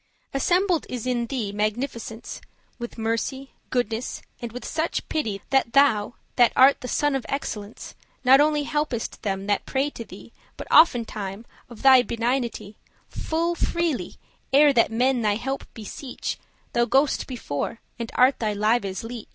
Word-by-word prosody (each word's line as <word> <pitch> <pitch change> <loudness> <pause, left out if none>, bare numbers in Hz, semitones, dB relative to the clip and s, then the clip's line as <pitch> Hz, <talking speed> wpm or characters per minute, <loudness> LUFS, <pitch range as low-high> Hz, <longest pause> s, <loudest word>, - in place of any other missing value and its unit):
Assembled 355 +4 +1
is 250 -2 -4
in 240 -2 0
thee 225 -5 -3
magnificence 220 +2 -3
<4> - - -25 0.3
With 235 0 -7
mercy, 230 +4 -2 0.2
goodness, 240 -1 -2 0.2
and 235 -1 -5
with 250 +2 -8
such 320 +1 -2
pity, 215 -11 -2
That 270 -4 +2
thou, 250 -6 +3 0.2
that 240 -2 +6
art 270 +2 +6
the 250 - -5
sun 290 +2 +1
of 265 - -2
excellence, 215 -6 -5 0.3
Not 265 +2 +7
only 300 0 +2
helpest 295 -6 -2
them 195 -1 -2
that 205 0 0
pray 275 +2 0
to 235 - -7
thee, - - -13 0.2
But - - -7
oftentime, 225 - +3 0.2
of 235 -3 -12
thy 260 -2 +8
benignity, 235 -3 -2 0.3
Full 335 +2 -1
freely, 340 -4 -1 0.4
ere 285 +1 +6
that 230 -3 +3
men 250 +2 +2
thine 210 -2 +1
help 270 +4 -4
beseech, 235 +4 -6 0.3
Thou 240 0 +3
go'st 270 +3 +2
before, 230 - -4 0.2
and 230 -1 -4
art 255 +2 +4
their 215 -2 -1
lives' 210 -2 0
leech. 230 -1 -7
245 Hz, 155 wpm, -24 LUFS, 225-275 Hz, 0.4 s, thy